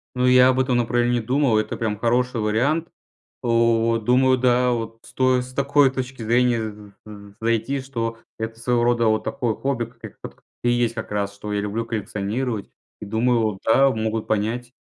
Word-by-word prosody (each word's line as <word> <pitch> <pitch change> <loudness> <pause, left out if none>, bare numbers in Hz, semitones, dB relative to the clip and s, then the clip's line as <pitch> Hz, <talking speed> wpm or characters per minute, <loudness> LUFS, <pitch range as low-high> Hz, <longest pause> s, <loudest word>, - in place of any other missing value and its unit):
Ну, 125 0 +1
я 125 0 +6
об 130 0 +2
этом 130 -1 +1
направлении 120 0 +1
думал, 125 -1 +2
это 110 - -2
прям 110 -2 -2
хороший 120 +1 0
вариант. 130 +11 0 0.5
У, 115 -1 +2
думаю, 130 +3 +3
да, 125 0 +3
вот 115 -1 -3
стоит 130 +1 +1
с 130 - -12
такой 140 0 +3
точки 130 -2 -5
зрения, 120 +1 +2
м, 105 -2 -7
з 100 -1 -12
з - - -37
зайти, 115 +4 0
что 115 -4 -4 0.2
это 115 0 -5
своего 120 0 +1
рода 120 -1 +2
вот 110 0 +1
такое 115 -3 -2
хобби, 135 -2 -2
как 115 -1 -23
ит 110 - -9
кт - - -9 0.3
и 120 - +3
есть 120 -1 +1
как 110 -2 -6
раз, 100 -1 -2
что 105 +1 -7
я 105 - 0
люблю 105 +3 -3
коллекционировать 110 +1 -3 0.3
и 105 - -7
думаю, 110 -1 +1
да, 135 +5 +4
могут 110 -2 -2
понять. 115 +4 -2
115 Hz, 185 wpm, -22 LUFS, 110-125 Hz, 0.5 s, я